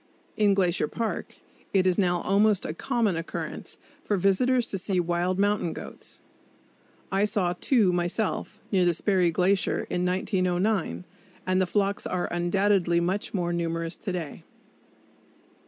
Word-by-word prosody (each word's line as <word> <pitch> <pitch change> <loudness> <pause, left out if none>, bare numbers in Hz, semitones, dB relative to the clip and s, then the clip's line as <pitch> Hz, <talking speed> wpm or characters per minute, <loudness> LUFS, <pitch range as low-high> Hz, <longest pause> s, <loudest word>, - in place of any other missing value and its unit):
In 205 -2 +3
Glacier 180 -5 +1
Park 230 +5 -4 0.4
it 190 -2 +3
is 185 0 +2
now 175 -3 +2
almost 205 +1 +3
a 155 - -3
common 230 -1 0
occurrence 165 0 -5 0.3
for 205 - 0
visitors 235 +7 +2
to 195 - -3
see 185 0 -1
wild 175 +1 0
mountain 205 -4 +1
goats. - - -7 0.9
I 195 +1 +2
saw 195 -4 +1
two 215 -9 +3
myself, 175 +5 -2
near 190 -3 +3
the 175 -1 +3
Sperry 185 -1 +2
Glacier, 185 +3 +1
in 180 - 0
1909, 180 - 0 0.4
and 185 0 +2
the 185 - +1
flocks 200 +1 0
are 180 -1 -1
undoubtedly 175 0 +2
much 185 +5 -2
more 175 -2 0
numerous 165 0 -2
to 200 - -4
day. 170 -5 -5
185 Hz, 140 wpm, -26 LUFS, 175-205 Hz, 0.9 s, In